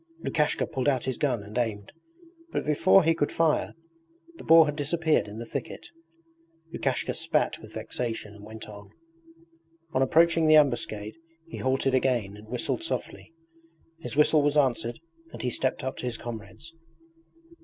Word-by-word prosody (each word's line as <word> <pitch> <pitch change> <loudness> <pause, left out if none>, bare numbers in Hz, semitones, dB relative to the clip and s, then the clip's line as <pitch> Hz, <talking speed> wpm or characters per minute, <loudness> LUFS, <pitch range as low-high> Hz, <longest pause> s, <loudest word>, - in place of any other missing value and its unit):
Lukashka 150 -1 +1
pulled 130 +1 -3
out 130 -3 0
his 130 -2 -3
gun 125 -8 0
and 105 +1 -11
aimed, 105 -4 -3 0.6
but - - -2
before 165 +6 +5
he 165 +1 +3
could 145 -3 -1
fire 165 -2 +1 0.6
the - - -10
boar 165 0 +7
had 150 -1 -3
disappeared 155 -1 +1
in 105 +1 -9
the 115 - -6
thicket. - - -6 0.8
Lukashka - - -1
spat - - 0
with - - -13
vexation 115 -4 -4
and 105 -1 -14
went 110 +1 -10
on. 100 -1 -11 1.0
On 130 - +1
approaching 165 +4 +4
the 155 - +7
ambuscade 120 -6 +1 0.3
he 165 - -9
halted 130 0 0
again 125 -6 +1
and 105 +1 -13
whistled 125 - -3
softly. 330 - -5 0.7
His 160 - -7
whistle 150 0 +5
was 145 +1 +1
answered 120 -3 +1 0.4
and - - -7
he 125 - 0
stepped 130 +2 -1
up 130 +1 -4
to 125 - -4
his 120 - -3
comrades. 115 +7 -9
130 Hz, 160 wpm, -27 LUFS, 110-155 Hz, 1.0 s, boar